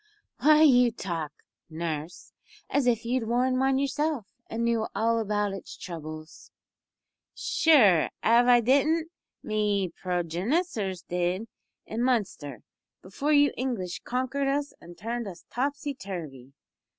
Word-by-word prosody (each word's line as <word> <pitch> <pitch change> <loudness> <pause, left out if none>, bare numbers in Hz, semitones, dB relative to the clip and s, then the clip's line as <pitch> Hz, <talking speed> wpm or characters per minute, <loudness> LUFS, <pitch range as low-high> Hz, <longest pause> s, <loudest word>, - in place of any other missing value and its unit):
"Why 305 +1 +6
you 250 -5 +6
talk, 170 -8 -4 0.4
nurse, 160 0 -5 0.4
as 280 -3 +2
if 230 -2 +1
you 250 +2 +1
had 225 -2 -5
worn 255 +2 +2
one 265 0 +2
yourself, 280 -2 -1 0.2
and 230 +1 -2
knew 230 -1 +1
all 230 +1 +2
about 210 -2 -1
its 195 - -8
troubles." 155 -2 -9 0.9
"Sure, 215 - +4
av 235 +2 +5
I 245 -1 +6
didn't, 310 +7 +2 0.3
me 210 -3 0
progenissors 185 - -2
did, 180 +4 -1 0.4
in 225 +2 -4
Munster, 195 - -1 0.4
before 275 +11 -2
you 290 -2 +5
English 230 -9 -3
konkered 260 +3 -1
us 285 +1 -1
an' 175 +1 -12
turned 230 +4 -4
us 180 -3 -10
topsy 280 +3 -2
turvy. 160 - -8
230 Hz, 125 wpm, -27 LUFS, 180-265 Hz, 0.9 s, Why